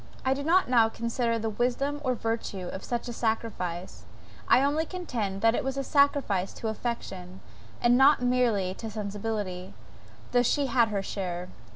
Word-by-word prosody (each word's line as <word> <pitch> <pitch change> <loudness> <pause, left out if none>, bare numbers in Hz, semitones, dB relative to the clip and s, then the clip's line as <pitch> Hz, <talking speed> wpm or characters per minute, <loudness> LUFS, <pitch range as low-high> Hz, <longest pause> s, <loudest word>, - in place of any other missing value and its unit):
I 260 - +3
do 275 - -4
not 345 +6 +3
now 235 -3 +4
consider 235 +1 -1
the 225 0 -2
wisdom 265 +6 -1
or 255 -2 +1
virtue 225 -5 -3
of 190 - -6
such 240 0 -3
a 240 - -4
sacrifice, 215 -7 -3 0.4
I 260 - +5
only 295 +3 +2
contend 240 - -4
that 225 +1 +4
it - - -1
was 270 0 -3
a 275 - -1
sacrifice 280 -10 +2
to 225 - -4
affection, 190 -5 -5 0.4
and 240 +1 +5
not 280 +2 +6
merely 245 -7 +1
to 225 +3 -7
sensibility, 205 -3 -4 0.6
though 245 - +4
she 280 +4 +2
had 240 -3 +3
her 200 -2 -2
share. 180 -2 -4
230 Hz, 170 wpm, -28 LUFS, 200-255 Hz, 0.6 s, not